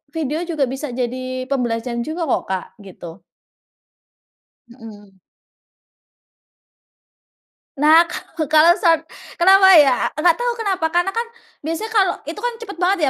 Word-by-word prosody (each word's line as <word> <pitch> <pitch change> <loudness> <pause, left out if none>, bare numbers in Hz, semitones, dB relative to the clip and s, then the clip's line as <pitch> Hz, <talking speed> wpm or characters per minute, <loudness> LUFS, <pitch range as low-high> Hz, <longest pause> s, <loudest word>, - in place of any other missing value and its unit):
video 310 -1 -3
juga 310 -5 -1
bisa 270 +3 -6
jadi 255 +1 -4
pembelajaran 235 -2 -2
juga 330 +2 -4
kok, - - 0
Kak, 190 -1 -3 0.2
gitu. 175 -1 -12 1.5
Mmm. 215 -5 -15 2.6
Nah, 320 +3 +5
kalau 330 -2 -6
kalau 310 +3 +5
short 330 -2 +2 0.3
kenapa 380 +2 +5
ya? 280 -5 +4
Nggak 325 +3 +3
tahu 485 0 0
kenapa, 390 -7 -1
karena 350 +2 +1
kan 460 +3 -3 0.3
biasanya 330 +9 -5
kalau 390 -5 +2
itu 315 +7 -8
kan 485 +2 -3
cepet 450 -6 -10
banget 370 +2 +1
315 Hz, 125 wpm, -19 LUFS, 255-360 Hz, 2.6 s, Nah